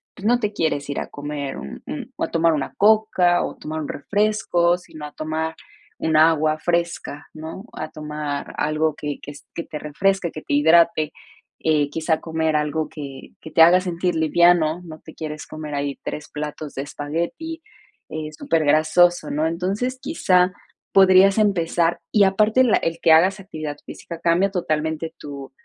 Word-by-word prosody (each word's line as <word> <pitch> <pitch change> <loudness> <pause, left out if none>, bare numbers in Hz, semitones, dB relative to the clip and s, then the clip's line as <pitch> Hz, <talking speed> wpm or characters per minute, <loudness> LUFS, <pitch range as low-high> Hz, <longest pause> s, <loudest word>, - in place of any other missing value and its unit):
pues 195 - -10
no 240 +2 +4
te 210 -3 -2
quieres 145 -6 -1
ir 140 - -2
a - - -5
comer 145 -1 -5
un 70 - -8
un - - -6
o - - -3
a - - -2
tomar 165 0 +3
una 145 -3 -3
coca 205 -4 +4
o - - -4
tomar 155 +1 -5
un 150 - -4
refresco, 200 -1 +1
sino 155 -4 -10
a 150 - -8
tomar 160 +1 -3 0.4
un 160 -1 +1
agua 155 -1 +4
fresca, 170 -3 -2
¿no? 160 +5 -8
A 155 - -5
tomar 150 -2 -5
algo 155 0 0
que 145 -1 -5
que 145 - -8
s 145 -1 -13
que 170 - -4
te 150 - -7
refresque, 180 +4 0
que 155 - -8
te - - -4
hidrate, 160 +1 +4 0.5
eh, 150 -2 +1
quizá 160 +1 0
comer 160 -1 -1
algo 150 +1 -1
que 140 -3 -9
que 160 - -10
te - - +4
haga 175 +3 +8
sentir 180 -1 -1
liviano, 165 +1 +3
no 160 -2 -10
te - - -13
quieres 155 -1 -6
comer 155 -1 -7
ahí 140 -1 -2
3 150 - -6
platos 150 0 -6
de 135 - -2
espagueti, 170 - -4 0.5
eh, 155 0 -5
super 160 -2 0
grasoso, 155 +2 +3
¿no? 155 +2 +1
Entonces, 195 +10 -2
quizá 185 - +2 0.4
podrías 195 +1 +6
empezar 175 -5 +1
y 210 - +5
aparte 215 +6 +4
la 240 - +4
el 165 0 -2
que 165 - +4
hagas 185 +5 +5
actividad 155 -6 -6
física 170 -1 -9
cambia 175 +4 +2
totalmente 160 -2 -2
tu 140 -2 -9
160 Hz, 175 wpm, -22 LUFS, 150-180 Hz, 0.5 s, haga